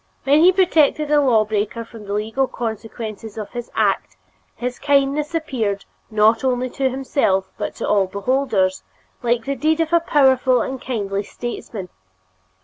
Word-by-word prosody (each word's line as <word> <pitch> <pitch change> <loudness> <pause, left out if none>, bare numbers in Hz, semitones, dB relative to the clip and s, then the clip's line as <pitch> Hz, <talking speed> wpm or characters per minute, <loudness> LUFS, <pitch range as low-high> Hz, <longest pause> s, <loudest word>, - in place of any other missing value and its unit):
When 285 +2 +4
he 350 +3 +7
protected 315 -5 +2
a 295 -1 +5
law 230 -6 +3
breaker 215 +2 -2
from 225 -2 -12
the 200 - -3
legal 220 +6 0
consequences 220 -2 -6
of 210 -2 -6
his 240 -1 -6
act, 195 - 0 0.4
his 245 0 -4
kindness 285 +2 +1
appeared, 230 -11 -2 0.2
not 220 +2 +3
only 255 -1 0
to 270 -1 0
himself 255 -7 0
but - - -4
to - - -4
all 200 -2 +3
beholders, 200 -2 0 0.4
like 235 -1 0
the 275 - -1
deed 310 +4 +1
of 325 0 0
a 340 - +6
powerful 265 -5 +3
and 260 -1 -5
kindly 200 -5 -2
statesman. 210 -3 -6
245 Hz, 155 wpm, -21 LUFS, 215-275 Hz, 0.4 s, he